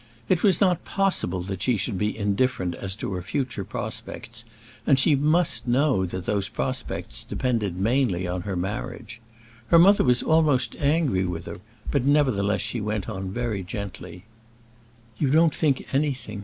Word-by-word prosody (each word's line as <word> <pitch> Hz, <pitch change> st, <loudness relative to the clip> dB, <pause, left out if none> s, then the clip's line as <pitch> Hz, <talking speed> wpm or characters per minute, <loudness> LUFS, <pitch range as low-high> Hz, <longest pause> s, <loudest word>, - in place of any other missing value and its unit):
It 180 Hz, -, +3 dB
was 190 Hz, -5 st, +4 dB
not 185 Hz, -4 st, +2 dB
possible 190 Hz, -, 0 dB
that 95 Hz, 0 st, -5 dB
she 125 Hz, 0 st, +2 dB
should 100 Hz, -1 st, -2 dB
be 105 Hz, +1 st, -1 dB
indifferent 100 Hz, -2 st, 0 dB
as 95 Hz, +2 st, -5 dB
to 100 Hz, -, -4 dB
her 90 Hz, -, -3 dB
future 120 Hz, +3 st, -3 dB
prospects, 115 Hz, +4 st, -6 dB, 0.4 s
and 135 Hz, -, +5 dB
she 145 Hz, +3 st, +4 dB
must 150 Hz, -4 st, +1 dB
know 125 Hz, -6 st, +2 dB
that 90 Hz, +1 st, -5 dB
those 100 Hz, -1 st, -1 dB
prospects -, -, -4 dB
depended 110 Hz, -8 st, -1 dB
mainly 105 Hz, -3 st, +1 dB
on 90 Hz, +1 st, -2 dB
her 95 Hz, +1 st, -4 dB
marriage. 105 Hz, +4 st, -5 dB, 0.5 s
Her 170 Hz, -, +6 dB
mother 195 Hz, +5 st, +6 dB
was 125 Hz, -1 st, +3 dB
almost 155 Hz, -6 st, +2 dB
angry 145 Hz, -, +2 dB
with 85 Hz, -2 st, -4 dB
her, -, -, -7 dB, 0.3 s
but 140 Hz, -4 st, +1 dB
nevertheless 130 Hz, -8 st, +2 dB
she 120 Hz, -, -2 dB
went 105 Hz, -1 st, -2 dB
on 95 Hz, -3 st, -4 dB
very 110 Hz, -2 st, -2 dB
gently: 90 Hz, -3 st, -7 dB, 1.0 s
"You 140 Hz, -, +2 dB
don't 160 Hz, +2 st, +4 dB
think 145 Hz, -5 st, +1 dB
anything! 130 Hz, -7 st, -1 dB
115 Hz, 160 wpm, -25 LUFS, 95-140 Hz, 1.0 s, Her